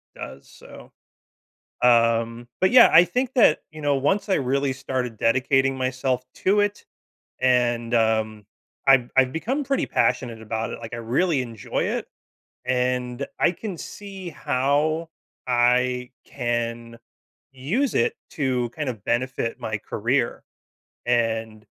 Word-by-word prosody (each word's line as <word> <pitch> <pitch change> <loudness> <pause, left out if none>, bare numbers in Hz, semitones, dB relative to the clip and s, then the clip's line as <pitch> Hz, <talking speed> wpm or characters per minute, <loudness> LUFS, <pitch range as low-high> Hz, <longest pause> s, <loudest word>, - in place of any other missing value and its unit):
does, - - -9
so - - -14 0.9
um, 115 0 +3
but 190 - +4
yeah, 255 - +8
I 170 +2 +8
think 250 +8 -2
that, 185 -10 +5
you 155 -1 -10
know, 145 -1 +1
once 195 +10 0
I 190 - +3
really 135 0 0
started 130 -3 -3
dedicating 135 +4 +2
myself 130 0 -1
to 205 +2 +2
it 205 0 -1 0.6
and, 120 -2 +2
um, 110 -2 +1 0.4
I've 135 -3 +5
I've 130 -1 +5
become 260 - -2
pretty 275 0 0
passionate 120 -3 0
about 110 +1 -3
it, - - -6
like 115 0 -7
I - - -5
really 135 +5 +1
enjoy 115 -4 -4
it, - - -2 0.6
and 125 +1 -1
I - - +4
can 190 -1 -6
see 195 -2 -8
how 150 +4 0 0.4
I 125 +1 +2
can 120 -2 -3 0.6
use 195 - -1
it 115 - +2 0.2
to 130 -4 0
kind 150 0 -4
of 110 -5 -9
benefit 120 -1 -1
my 110 -1 -3
career. - - -1 0.6
And, 115 -2 -1
125 Hz, 130 wpm, -24 LUFS, 120-150 Hz, 0.9 s, yeah